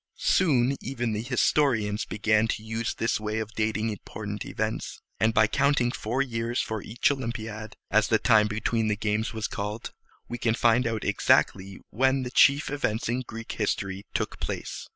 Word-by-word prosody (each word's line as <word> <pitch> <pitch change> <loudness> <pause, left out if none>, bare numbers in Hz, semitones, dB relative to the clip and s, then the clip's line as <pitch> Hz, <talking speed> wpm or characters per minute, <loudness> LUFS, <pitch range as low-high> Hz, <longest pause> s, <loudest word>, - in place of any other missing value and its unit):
Soon 140 -7 +3
even 120 -2 -2
the 105 - -2
historians 120 -4 +1
began 110 +1 +2
to 110 - -3
use 115 +1 -3
this 115 -1 0
way 105 0 -3
of 110 0 -4
dating 110 0 0
important 105 0 -6
events; 110 +1 -3 0.2
and 110 - +3
by 110 - +5
counting 125 +1 +2
four 125 +3 -1
years 115 -1 -2
for 110 -2 -2
each 120 +7 +1
Olympiad, 110 -5 -5 0.2
as 110 0 +4
the 110 - +3
time 110 -2 +4
between 110 +1 0
the 105 - +1
games 105 +2 -1
was 110 -2 -3
called, 105 +2 -5 0.4
we 120 - -5
can 115 -1 +1
find 120 +1 +3
out 110 -2 -2
exactly 95 0 +2
when 130 +3 +2
the 125 - -5
chief 140 +2 +4
events 115 -7 -1
in 125 +2 0
Greek 115 -2 -7
history 100 -2 -2
took - - -2
place. - - -5
110 Hz, 175 wpm, -27 LUFS, 110-120 Hz, 0.4 s, by